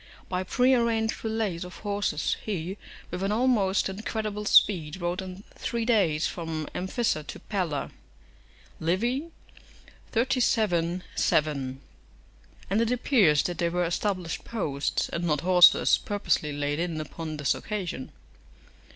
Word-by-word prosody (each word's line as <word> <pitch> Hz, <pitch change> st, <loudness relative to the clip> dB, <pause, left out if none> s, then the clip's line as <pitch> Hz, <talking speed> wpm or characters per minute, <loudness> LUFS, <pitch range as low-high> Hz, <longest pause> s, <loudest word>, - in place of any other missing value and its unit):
["By 180 Hz, 0 st, -1 dB
pre 250 Hz, +7 st, +3 dB
arranged 230 Hz, -2 st, +1 dB
relays 220 Hz, -6 st, -1 dB
of 180 Hz, 0 st, -9 dB
horses, 205 Hz, -6 st, -1 dB
he, 190 Hz, -3 st, -3 dB, 0.4 s
with 180 Hz, +1 st, -4 dB
an 195 Hz, +1 st, 0 dB
almost 215 Hz, -4 st, +2 dB
incredible 210 Hz, +1 st, -4 dB
speed, 175 Hz, -5 st, +4 dB
rode 175 Hz, +1 st, -2 dB
in 190 Hz, +1 st, -8 dB
three 235 Hz, -1 st, -3 dB
days 185 Hz, -10 st, +2 dB
from 160 Hz, -3 st, -4 dB
Amphissa 190 Hz, -2 st, -1 dB
to -, -, -7 dB
Pella." 175 Hz, -8 st, -2 dB, 0.9 s
Livy, 235 Hz, -, 0 dB, 0.8 s
xxxvii. 215 Hz, -8 st, +1 dB
7.] 140 Hz, -3 st, 0 dB, 0.9 s
And 210 Hz, +3 st, +3 dB
it 230 Hz, -, +1 dB
appears 220 Hz, -, +4 dB
that 175 Hz, -2 st, -3 dB
they 170 Hz, -, +2 dB
were 175 Hz, +1 st, 0 dB
established 180 Hz, 0 st, -2 dB
posts, 145 Hz, -12 st, -1 dB
and 170 Hz, -, -3 dB
not 150 Hz, -4 st, +1 dB
horses 180 Hz, -1 st, +6 dB
purposely 200 Hz, -7 st, 0 dB
laid 145 Hz, +1 st, -2 dB
in 170 Hz, -2 st, -2 dB
upon 155 Hz, 0 st, -6 dB
this 145 Hz, -3 st, +2 dB
occasion. 185 Hz, -11 st, -5 dB
185 Hz, 125 wpm, -27 LUFS, 165-215 Hz, 0.9 s, horses